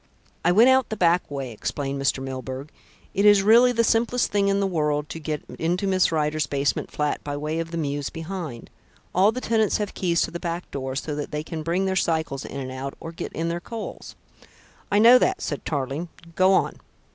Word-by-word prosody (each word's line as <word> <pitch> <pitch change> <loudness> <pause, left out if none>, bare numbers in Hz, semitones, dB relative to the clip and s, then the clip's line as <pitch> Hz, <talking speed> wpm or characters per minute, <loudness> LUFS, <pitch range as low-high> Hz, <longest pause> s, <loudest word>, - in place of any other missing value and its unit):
"I 175 - +4
went 220 +7 +6
out 260 0 +3
the 220 - -4
back 175 -1 +2
way," 135 -3 -4
explained 140 +5 -3
Mr. 135 -1 0
Milburgh. 130 +2 -6 0.4
"It 200 - +1
is 205 -1 +6
really 235 +4 +6
the 230 -1 +2
simplest 235 +2 +1
thing 200 -1 +2
in 200 0 +2
the 200 - +1
world 150 -5 0
to 165 - -6
get 150 -1 -4 0.2
into 175 +4 0
Miss 185 -3 +2
Rider's 155 -1 0
basement 140 0 -1
flat 150 -1 -2
by 145 0 -4
way 155 +2 -2
of 165 0 -3
the 170 - -5
mews 145 -2 -2
behind. 165 -7 -6 0.4
All 195 +4 +5
the 255 - -5
tenants 220 -3 +2
have 210 -1 -3
keys 170 -2 +1
to - - -3
the 170 - -5
back 170 0 -4
door 130 -1 -4
so 150 +2 -3
that 145 0 -4
they 150 0 -3
can 160 0 -5
bring 170 +4 0
their 190 0 0
cycles 160 -6 0
in 140 - -6
and 130 -1 -5
out, 135 +1 -5
or 165 - -7
get 165 - -6
in 165 +1 -2
their 170 +1 -2
coals." 225 +3 -7 0.8
"I 205 - +3
know 235 +4 +8
that," 375 +7 +1
said - - -4
Tarling. 145 +3 -3 0.2
"Go 185 +2 +4
on." 190 - +2
165 Hz, 215 wpm, -24 LUFS, 145-195 Hz, 0.8 s, know